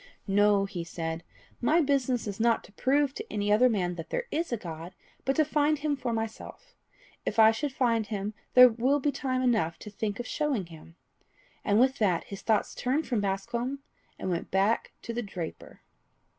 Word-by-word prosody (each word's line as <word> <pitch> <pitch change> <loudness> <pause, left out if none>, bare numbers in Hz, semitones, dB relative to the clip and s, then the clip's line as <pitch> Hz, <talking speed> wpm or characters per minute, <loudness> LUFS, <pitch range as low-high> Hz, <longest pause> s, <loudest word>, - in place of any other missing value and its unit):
"No," 205 0 +3
he 180 -3 -5
said, 165 -1 -4 0.4
"my 310 +7 +4
business 270 -5 +1
is 205 -1 -5
not 230 0 +2
to - - -16
prove 275 +5 +1
to 435 +6 -8
any 205 0 0
other 250 +4 +5
man 180 -6 0
that 165 - -7
there - - -1
is 330 0 -1
a 235 - 0
God, 170 -1 -8 0.3
but 270 - +1
to 310 - +3
find 300 0 +2
him 295 0 -1
for 255 -3 -3
myself. 225 - -5 0.5
If - - -3
I 220 0 +8
should 285 +5 -2
find 230 -4 +1
him, 205 0 -3 0.2
then 250 -2 +8
will 265 +5 +2
be 285 +1 +1
time 260 -2 -1
enough 220 -10 +1
to 210 - -10
think 205 +1 -3
of 245 - -4
showing 280 - -1
him." 165 0 -14 0.7
And 205 +1 +3
with 260 +2 +3
that 185 -6 +2
his 200 - -9
thoughts 220 -2 +1
turned 275 +6 -1
from 235 -5 0
Bascombe, 235 +7 -2 0.4
and 185 - -3
went 170 - -3
back 195 +4 +1
to 230 - -5
the 240 - -2
draper. 180 -6 -7
225 Hz, 195 wpm, -28 LUFS, 195-265 Hz, 0.7 s, I